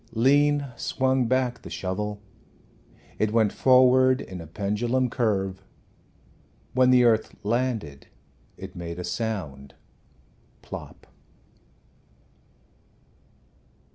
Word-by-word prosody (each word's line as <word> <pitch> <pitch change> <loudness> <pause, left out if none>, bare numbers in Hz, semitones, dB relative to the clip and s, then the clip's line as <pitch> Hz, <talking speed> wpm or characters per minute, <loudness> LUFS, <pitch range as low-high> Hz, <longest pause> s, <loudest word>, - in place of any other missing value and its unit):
Lean 145 +4 +3
swung 130 -2 0
back 125 -1 0
the - - -10
shovel. 105 +2 -4 1.0
It 110 -1 +1
went 110 -2 +2
forward 130 0 +5
in 95 -8 -8
a 80 - -10
pendulum 115 +8 -1
curve. 95 -5 -1 1.1
When 130 0 +4
the 125 -1 +5
earth 110 -2 +2
landed 110 - -2 0.5
it - - -10
made 85 -1 -6
a 90 - -5
sound 90 - -4 0.9
plop! - - -10
115 Hz, 90 wpm, -25 LUFS, 95-130 Hz, 1.1 s, forward